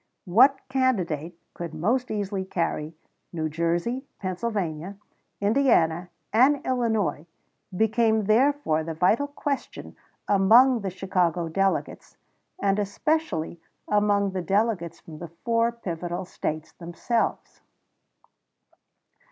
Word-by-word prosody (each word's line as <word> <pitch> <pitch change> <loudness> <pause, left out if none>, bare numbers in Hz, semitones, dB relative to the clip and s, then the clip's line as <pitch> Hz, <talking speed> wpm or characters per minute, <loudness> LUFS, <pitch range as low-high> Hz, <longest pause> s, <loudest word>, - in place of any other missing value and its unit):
What 260 +9 +4
candidate 180 - -1 0.2
could 170 -2 -6
most 235 +11 0
easily 200 -2 -2
carry 165 -4 -3 0.4
New 160 -2 -2
Jersey, 170 - -1
Pennsylvania, 185 -3 -3 0.4
Indiana, 200 -7 +2 0.2
and 265 +6 +5
Illinois, 220 - 0 0.5
became 220 0 +2
therefore 220 - +2
the 160 0 -5
vital 215 - +2
question 285 -1 -5 0.3
among 230 +5 +5
the 195 - -2
Chicago 180 -3 0
delegates, 195 +3 -1 0.4
and 200 0 +1
especially 200 - -1 0.3
among 205 -1 +2
the 185 -1 -3
delegates 195 -4 0
from 155 -2 -12
the 170 - -6 0.2
four 230 0 +2
pivotal 175 -5 -5
States 155 -2 -4
themselves. 175 +7 -3
195 Hz, 100 wpm, -25 LUFS, 170-235 Hz, 0.5 s, and